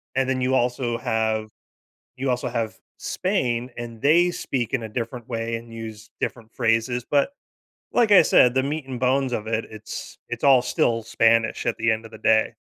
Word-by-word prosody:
And 130 Hz, 0 st, +2 dB
then 130 Hz, -1 st, 0 dB
you 130 Hz, +1 st, +2 dB
also 120 Hz, -1 st, 0 dB
have 110 Hz, -1 st, -1 dB, 0.7 s
you 135 Hz, +1 st, -2 dB
also 125 Hz, 0 st, -1 dB
have 115 Hz, -2 st, -2 dB, 0.2 s
Spain, 125 Hz, -, -1 dB
and 115 Hz, -1 st, -7 dB
they 170 Hz, +5 st, +4 dB
speak 125 Hz, -8 st, -3 dB
in 135 Hz, -, +1 dB
a 110 Hz, -, -6 dB
different 115 Hz, +1 st, -5 dB
way 115 Hz, -1 st, -2 dB
and 115 Hz, 0 st, -12 dB
use 110 Hz, -1 st, -8 dB
different 115 Hz, -2 st, -4 dB
phrases. 115 Hz, +1 st, +1 dB
But, 140 Hz, -1 st, +3 dB, 0.6 s
like 235 Hz, -3 st, +3 dB
I 190 Hz, -, +9 dB
said, 125 Hz, -5 st, +5 dB
the 130 Hz, -, +3 dB
meat 145 Hz, +1 st, -3 dB
and 130 Hz, -2 st, -5 dB
bones 130 Hz, 0 st, +1 dB
of 110 Hz, -2 st, -2 dB
it 115 Hz, 0 st, -1 dB
it's 110 Hz, 0 st, -8 dB
it's -, -, -5 dB
all 135 Hz, -3 st, +6 dB
still 115 Hz, -2 st, +1 dB
Spanish 115 Hz, 0 st, +2 dB
at -, -, 0 dB
the 115 Hz, 0 st, +1 dB
end 110 Hz, +1 st, -1 dB
of 115 Hz, -, -12 dB
the 110 Hz, -, -10 dB
day. 110 Hz, 0 st, +3 dB
120 Hz, 195 wpm, -24 LUFS, 115-130 Hz, 0.7 s, I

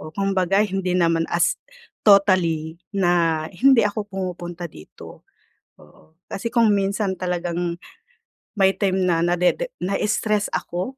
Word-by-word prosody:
Oh 155 Hz, -, -9 dB
kumbaga 195 Hz, 0 st, +1 dB
hindi 185 Hz, -2 st, -2 dB
naman 165 Hz, -1 st, +1 dB
as 170 Hz, -1 st, +1 dB, 0.5 s
totally 180 Hz, -5 st, +3 dB
na 175 Hz, -5 st, +1 dB
hindi 250 Hz, +3 st, +4 dB
ako 210 Hz, 0 st, -3 dB
pumupunta 180 Hz, -2 st, -6 dB
dito, 75 Hz, -, -14 dB, 0.6 s
oo. 160 Hz, +1 st, -22 dB
Kasi 230 Hz, +4 st, -4 dB
kung 230 Hz, -4 st, +3 dB
minsan 195 Hz, 0 st, -1 dB
talagang 175 Hz, -1 st, -3 dB, 0.8 s
may 195 Hz, 0 st, +4 dB
time 190 Hz, -2 st, 0 dB
na 165 Hz, -2 st, +1 dB
nadede 180 Hz, -, +1 dB
na-stress 210 Hz, +1 st, -1 dB
ako, 185 Hz, +10 st, -4 dB
185 Hz, 120 wpm, -22 LUFS, 175-200 Hz, 0.8 s, hindi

